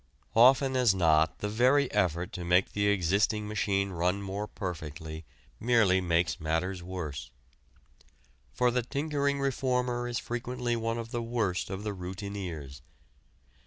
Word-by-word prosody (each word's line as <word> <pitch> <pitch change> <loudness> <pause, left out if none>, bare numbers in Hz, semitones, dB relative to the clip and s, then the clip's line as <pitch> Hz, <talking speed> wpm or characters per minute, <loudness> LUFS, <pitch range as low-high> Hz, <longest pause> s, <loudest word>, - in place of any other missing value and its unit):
Often 130 +3 +6
as 120 -6 +4
not 80 -3 +3
the 105 - -1
very 125 +6 +3
effort 90 -4 0
to 90 - -5
make 90 +2 +3
the 100 0 0
existing 100 +2 +1
machine 100 -2 0
run 90 +2 0
more 100 +2 -4
perfectly 80 -5 -6 0.3
merely 110 -6 +3
makes 85 -3 +1
matters 80 +4 -1
worse. 85 -7 -6 1.2
For 125 0 +2
the 125 +1 +1
tinkering 140 +2 -1
reformer 125 -2 0
is 120 -1 -2
frequently 120 0 -3
one 115 0 -2
of 115 0 -6
the 120 - -2
worst 115 -7 -1
of 95 +1 -5
the 105 -1 -3
routineers. 90 -7 -6
100 Hz, 135 wpm, -29 LUFS, 90-120 Hz, 1.2 s, Often